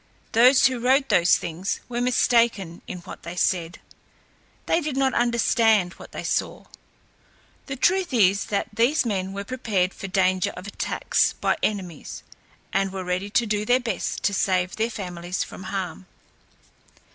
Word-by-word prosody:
Those 250 +4 +6
who 260 -2 +2
wrote 265 +3 +2
those 175 0 +5
things 175 +3 -4
were 240 0 -3
mistaken 235 -7 +2
in 180 - -6
what - - -10
they 170 +1 -7
said. 175 -2 0 0.9
They 330 - +2
did 295 -3 -3
not 270 -1 +2
understand 225 -5 +2
what - - -13
they - - -6
saw. - - -2 1.0
The 275 - -4
truth 360 +6 +2
is 200 -5 +3
that 200 - -2
these 245 +7 +2
men 190 -4 -2
were 200 +1 -5
prepared 200 -6 -1
for 195 - -7
danger 185 -1 +1
of 180 - -8
attacks 205 - 0
by - - 0
enemies, 185 -7 -4 0.5
and 195 0 +1
were 190 -1 -5
ready 180 +2 -2
to 235 +3 +2
do 210 -1 -1
their 245 +4 +3
best 245 -2 -3
to 200 - +1
save 185 -1 0
their 225 +1 0
families 180 -4 -4
from 185 - -10
harm. 190 -2 -5
200 Hz, 160 wpm, -24 LUFS, 185-240 Hz, 1.0 s, Those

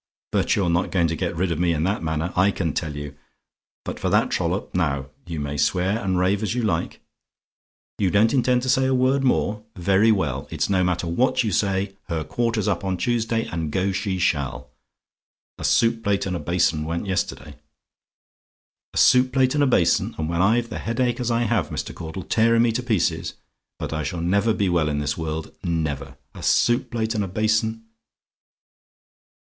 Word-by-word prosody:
"But - - +2
you're 90 -4 +1
not 85 +2 +1
going 85 -3 +2
to 80 - -1
get 85 0 -2
rid 90 +1 0
of 80 - -2
me 85 -1 +2
in 75 - -1
that 100 +4 0
manner, 80 +2 -2
I 95 +2 +4
can 85 -6 -2
tell 80 -3 -3
you. 75 -1 -7 0.7
But - - -5
for - - -1
that - - +2
trollop - - -2
now, 70 -7 -1 0.2
you 85 -3 -4
may 75 0 -3
swear 95 +9 +1
and 95 -1 0
rave 95 +3 +1
as 110 +2 -1
you 125 - -1
like 85 -6 -1 1.0
"YOU 95 - +2
DON'T 105 +4 +3
INTEND 125 -1 +2
TO - - -3
SAY 130 +1 +3
A 130 - +2
WORD 130 +2 +2
MORE? 105 -4 +1
"Very 100 +5 +3
well; 75 - -1
it's - - -1
no 95 -1 +3
matter 90 -1 0
what 130 +9 +1
you 110 - -1
say 95 0 0
her 80 -3 -2
quarter's 115 -1 -1
up - - 0
on 95 -1 -1
Tuesday, 115 +1 0
and 80 -2 -3
go 95 +4 0
she 95 0 -2
shall. 70 -6 -1 0.9
A - - -6
soup 115 0 +2
plate 100 -2 +1
and 95 -1 -2
a - - -3
basin 80 -1 +1
went 85 +4 -3
yesterday. 90 -6 -3 1.4
"A - - -2
soup 130 0 +5
plate 130 -1 +2
and 145 -1 +2
a - - +3
basin, 95 -9 +2
and 80 - -2
when 85 +1 0
I've 115 +4 +2
the 110 - -5
headache 120 +2 -1
as 125 -1 -1
I 120 0 +1
have, 115 - 0
Mr. - - -4
Caudle, 85 +2 -7
tearing 115 +5 +3
me 120 - +3
to 115 - -2
pieces! 115 -7 -1 0.4
But - - -5
I 80 - -2
shall 85 +2 -3
never 100 +6 +2
be 100 -2 0
well 85 -4 +1
in 75 - -1
this 75 0 -1
world 80 -1 -4
never. 70 -5 -2 0.2
A - - -10
soup 120 +1 +2
plate 115 -1 -1
and 105 -3 0
a - - -3
basin!" 110 +3 0
95 Hz, 200 wpm, -23 LUFS, 85-115 Hz, 1.4 s, soup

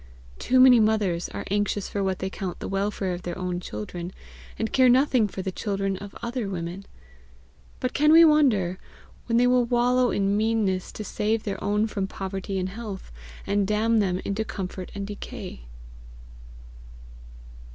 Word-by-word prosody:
Too 255 - +2
many 255 -2 +8
mothers 210 -6 +1
are - - -6
anxious 205 -1 0
for 200 - -2
what 190 -1 0
they 190 - -3
count 185 -2 -5
the - - -6
welfare 195 -1 -1
of 175 - -5
their 175 -1 -5
own 180 -1 -2
children, 170 - -6 0.5
and 225 - -3
care 260 -1 +5
nothing 255 -3 +4
for 190 -1 -6
the 190 - -2
children 195 0 -2
of 200 +1 -10
other 235 -3 -3
women! 180 +1 -5 0.9
But 255 - -2
can 300 +1 +4
we 330 +1 +9
wonder, 225 - +3 0.5
when 230 -1 +2
they 245 - +5
will 250 0 +4
wallow 245 +1 +2
in 200 0 +1
meannesses 210 -4 0
to 215 - -6
save 215 +1 -1
their 195 -2 -4
own 210 +1 +1
from 200 -3 -2
poverty 195 0 -4
and 185 0 -1
health, 200 -1 -7 0.3
and 200 -1 +1
damn 220 +2 +2
them 185 -3 +1
into 200 +2 -1
comfort 185 -3 -6
and 200 0 -4
decay. 195 - -8
205 Hz, 165 wpm, -25 LUFS, 190-230 Hz, 0.9 s, we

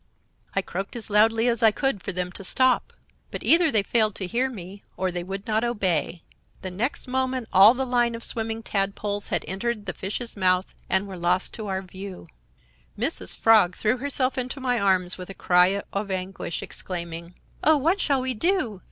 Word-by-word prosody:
I 195 - +1
croaked 195 +5 -5
as 225 -2 -7
loudly 225 +3 +4
as 235 -1 +1
I 225 - +7
could 250 -1 -1
for 195 - -3
them 180 0 -2
to 195 - -7
stop; 255 +6 +2 0.4
but - - -6
either 335 0 +6
they 215 -7 +2
failed 215 -1 +1
to 190 - -3
hear 240 +8 0
me, 200 -3 -9 0.2
or 185 0 0
they 175 0 -4
would 195 +2 -6
not 220 +1 0
obey. 185 -8 0 0.4
The 185 - -4
next 235 +9 -2
moment 260 -2 -1
all 205 +6 +8
the 265 +1 -1
line 240 -2 +1
of 230 - -8
swimming 225 0 -3
tadpoles 200 0 -2
had - - -1
entered 210 +3 -3
the 185 - -3
fish's 210 +5 -5
mouth 185 -1 +1 0.2
and 190 +1 +2
were 190 -2 -7
lost 180 +2 +1
to 215 -2 -5
our 190 -1 -2
view. 190 - -9 0.7
"Mrs. 90 - -1
Frog 215 -6 +5
threw 220 +4 +1
herself 265 -1 -1
into 255 +3 -4
my 250 -2 0
arms 185 -2 +1
with 180 - -8
a 195 - -8
cry 180 +2 +3
or 200 0 -2
anguish, 185 -2 -4
exclaiming: 170 -1 -7 0.3
"'Oh, 315 0 +5
what 335 +8 +1
shall 275 -3 +1
we 260 0 -1
do? 250 - 0
205 Hz, 195 wpm, -25 LUFS, 185-245 Hz, 0.7 s, all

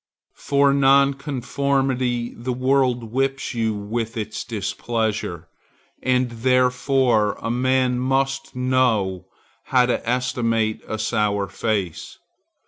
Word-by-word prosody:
For 140 0 +3
nonconformity 135 -2 +1
the 125 +2 -4
world 130 -3 +1
whips 135 +2 -1
you 110 -2 0
with 110 +3 -4
its 110 0 -4
displeasure. 110 -5 -3 0.5
And 125 -1 +1
therefore 125 -2 +2
a 115 - -3
man 130 0 +1
must 135 +1 -1
know 125 -8 +1 0.4
how 125 -1 +3
to 120 -1 -2
estimate 115 -3 0
a 110 - -3
sour 105 -2 0
face. 100 -8 -3
125 Hz, 100 wpm, -22 LUFS, 110-130 Hz, 0.5 s, For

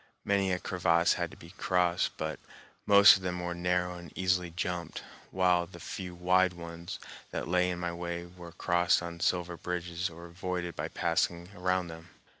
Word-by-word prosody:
Many 100 -1 +2
a 90 - +2
crevasse 85 -2 +2
had - - -2
to - - -14
be 85 - -13
crossed, 90 -3 +1
but 80 -1 -3 0.5
most 100 0 +9
of - - -11
them 90 -1 -2
were 90 0 -3
narrow 90 0 0
and 85 -3 -11
easily 90 -1 +1
jumped, 90 0 -4 0.3
while 90 -2 +2
the 85 0 -12
few 90 0 -6
wide 90 +1 +3
ones 85 0 -7 0.3
that - - -4
lay 90 0 +2
in 90 - -2
my 85 -1 -3
way 85 0 -4
were 85 -1 -11
crossed 85 0 +2
on 85 0 -6
sliver 90 0 0
bridges 90 0 -3
or 85 +1 -11
avoided 90 0 -4
by - - -3
passing 85 +1 0
around 90 0 0
them. 80 0 -10
90 Hz, 180 wpm, -30 LUFS, 85-90 Hz, 0.5 s, most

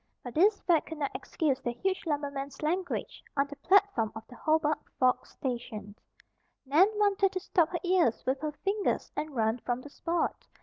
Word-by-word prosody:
But 245 - -7
this 400 +6 +4
fact 335 -4 +2
could 320 - -6
not 285 -2 -1
excuse 285 -6 -1
the 240 - -2
huge 380 +6 -2
lumberman's 280 -1 -3
language 350 +4 -2
on 275 - +4
the 285 0 -9
platform 375 - +3
of 220 - -8
the 250 - -14
Hobart 310 +1 +2 0.2
Forks 255 -1 +2
station. 235 -6 -5 0.7
Nan 305 +8 +6
wanted 400 -2 +3
to 370 - -1
stop 365 -3 +2
her 355 - -2
ears 355 -10 +2
with 265 +1 +1
her 305 -1 -1
fingers 395 +7 -1
and 305 -2 -4
run 225 +1 +1
from 245 +1 -2
the 290 - -11
spot. 340 +3 -2
300 Hz, 180 wpm, -30 LUFS, 260-365 Hz, 0.7 s, Nan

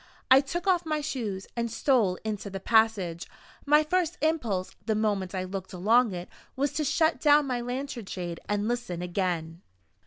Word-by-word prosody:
I 265 +1 +9
took 340 +6 -4
off 360 -3 +3
my 310 -2 -1
shoes, 225 -10 -4
and 235 -1 -1
stole 225 -6 +2
into 210 -2 -4
the 195 0 -5
passage. 205 -6 +2 0.4
My 300 +1 +6
first 355 +1 0
impulse, 240 - 0 0.2
the 220 - +2
moment 205 -3 -1
I 185 - -1
looked 190 +1 -6
along 220 +6 +3
it, 175 0 -6 0.3
was 275 +1 0
to 310 - -1
shut 315 +2 +2
down 295 -1 +5
my 250 -3 -2
lantern 245 -2 -5
shade, 175 -3 -5
and 205 0 0
listen 235 -8 -3
again. 175 -2 -2
225 Hz, 175 wpm, -28 LUFS, 190-285 Hz, 0.4 s, I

